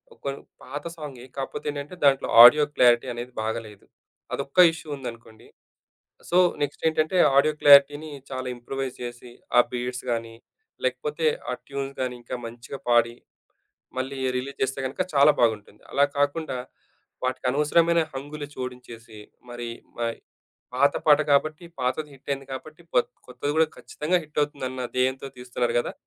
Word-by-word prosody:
ఒకొన్ 140 0 -5 0.3
పాత 145 +1 -6
సాంగే 140 -6 -8
కాపోతే 135 - -5
ఏంటంటే, 145 +5 -7
దాంట్లో 135 -1 +4 0.2
ఆడియో 150 +5 +9
క్లారిటీ 120 0 +5
అనేది 120 +1 -7
బాగాలేదు. 110 -2 -5 0.5
అదొక్క 140 +5 -3
ఇష్యూ 160 - -10
ఉందనుకోండి. 115 -4 -10 0.8
సో, 175 - +2 0.3
నెక్స్ట్ 145 +1 -3
ఏంటంటే 155 +3 0 0.2
ఆడియో 150 +2 +4
క్లారిటీని 145 +2 +7 0.2
చాలా 130 -1 -4
ఇంప్రొవైజ్ 130 +2 -5
చేసి, 120 0 -8 0.3
ఆ - - +11
బీడ్స్ 125 0 -4
గాని, 115 -1 -3 0.5
లేకపోతే 460 0 -1 0.2
ఆ - - -1
ట్యూన్స్ 140 0 -5
గాని 125 -1 -2
ఇంకా 120 - -6
మంచిగా 120 +4 -9
పాడి, 120 0 +3 0.8
మళ్ళీ 135 +1 -3 0.2
రిలీజ్ 135 +2 -7
చేస్తే 135 +1 -4
గనక 155 - -2
చాలా 140 +2 +7
బాగుంటుంది. 105 -2 0
అలా 140 - +4
కాకుండా, 145 0 0 0.7
వాటికనవసరమైన 150 +6 +2
హంగులు 145 +2 -6
చోడించేసి 120 -3 -8 0.3
మరి 120 -1 -6 0.3
మ - - -6 0.7
పాత 140 +3 +3
పాట 150 -1 +6
కాబట్టి 155 +4 +2
పాతది 130 +5 -1
హిట్టయింది 135 0 -5
కాబట్టి 155 +5 -9
కొత్ 125 - +3 0.2
కొత్తది 125 +3 -3
కూడా 160 0 +5
ఖచ్చితంగా 165 +5 -1
హిట్టవుతుందన్న 145 -4 -3
దేయంతో 130 +1 0
తీస్తున్నారు 125 -1 -2
గదా! - - -3
135 Hz, 135 wpm, -25 LUFS, 120-145 Hz, 0.8 s, ఆ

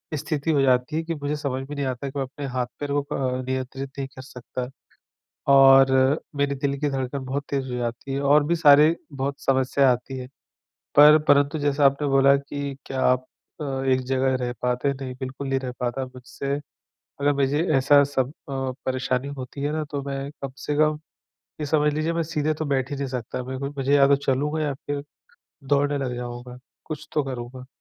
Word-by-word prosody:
स्थिति 150 +1 -1
हो 145 -3 +3
जाती 130 +2 +2
है 160 - 0
कि 165 0 -3
मुझे 145 0 -2
समझ 140 -3 -3
में 145 - -5
नहीं 140 -1 -2
आता 130 +1 -3
कि 140 - -8
मैं - - +1
अपने 140 +2 -8
हाथ-पैर 130 +3 -3
को 145 0 +2
अ, 130 -1 -1
नियंत्रित 130 +1 -4
नहीं 135 -1 -3
कर 130 -1 -12
सकता, 125 -1 -6 0.9
और 135 -1 +8 0.5
मेरे 140 0 +1
दिल 140 0 -1
की 150 - +1
धड़कन 135 0 -3
बहुत 135 +2 -3
तेज़ 140 -1 -1
हो - - -2
जाती 120 +3 -4
है 135 - -1
और 145 +1 +4
भी 170 +2 +2
सारे 150 0 +6 0.2
बहुत 140 +1 -3
समस्या 135 0 +3
आती 130 +2 -5
हैं। 125 0 -7 0.7
पर 150 +2 +9
परंतु 145 +2 +4
जैसा 145 0 +1
आपने 140 +2 +1
बोला 135 0 +5
कि 140 0 -5
क्या 135 -1 -3
आप 125 0 +2 0.3
अ, - - -3 0.2
एक 130 -1 +3
जगह 130 0 +2
रह 120 -1 -2
पाते, 125 +3 +1
नहीं 135 -1 -6
बिल्कुल 135 +1 -5
नहीं 135 0 +1
रह 130 -1 -4
पाता 125 +2 -1
मुझसे 130 +2 -5 0.7
अगर 145 +1 +3
मुझे 140 +2 +1
ऐसा 140 +2 +6
सब 135 -2 0
अ, 135 -3 -5
परेशानी 130 0 -1
होती 130 +2 -7
है 145 +1 0
ना 155 0 -1
तो 145 -1 -2
मैं 135 0 -3
कम 135 -1 -4
से 145 +1 -3
कम 155 0 +2 0.6
ये 150 - -2
समझ 150 0 +2
लीजिए 155 +2 0
मैं 165 0 0
सीधे 155 -1 0
तो 155 - -4
बैठ 130 -2 0
ही 145 - -3
नहीं 140 0 -2
सकता। 125 0 -4
मैं 130 +1 -5 0.2
मुझे 135 +1 +1
या 140 -1 +6
तो 140 - +5
चलूँगा 140 +3 -1
या 145 - 0
फिर 145 +1 -5 0.7
दौड़ने 145 0 +2
लग 130 -3 -2
जाऊँगा, 120 0 -7 0.3
कुछ 155 -2 -7
तो 150 - +2
करूँगा। 130 -1 -7
140 Hz, 200 wpm, -24 LUFS, 130-145 Hz, 0.9 s, पर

